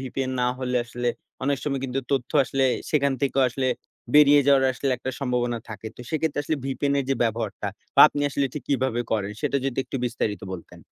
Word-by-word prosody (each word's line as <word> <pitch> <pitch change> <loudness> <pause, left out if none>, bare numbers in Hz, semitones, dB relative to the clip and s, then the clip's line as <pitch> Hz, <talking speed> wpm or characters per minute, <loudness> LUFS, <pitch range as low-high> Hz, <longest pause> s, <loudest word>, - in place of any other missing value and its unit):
VPN 130 0 -3
না - - +2
হলে 125 -1 -1
আসলে 120 0 -3 0.4
অনেক 140 -1 +1
সময় 140 -3 -1
কিন্তু 135 +1 -2
তথ্য 130 -3 0
আসলে 135 0 0 0.3
সেখান 140 -2 +2
থেকেও 135 -1 +2
আসলে 130 +1 -2 0.5
বেরিয়ে 145 -1 +8
যাওয়ার 135 -1 +5
আসলে 135 +2 -2
একটা 130 +2 -4
সম্ভাবনা 125 -3 0
থাকে। 110 0 -8
তো - - -10
সেক্ষেত্রে 155 -2 0
আসলে 155 +1 -1
VPN 140 +1 0
এর 140 - 0
যে - - +3
ব্যবহারটা 115 -2 -2 0.3
বা - - +6
আপনি 145 - -4
আসলে 140 0 +1
ঠিক 150 - -5
কীভাবে 130 -3 +1
করেন 105 -2 0
সেটা 140 - 0
যদি 135 -1 -2
একটু - - -5
বিস্তারিত 110 -3 -2
বলতেন? 90 -3 -9
135 Hz, 195 wpm, -25 LUFS, 120-140 Hz, 0.5 s, বেরিয়ে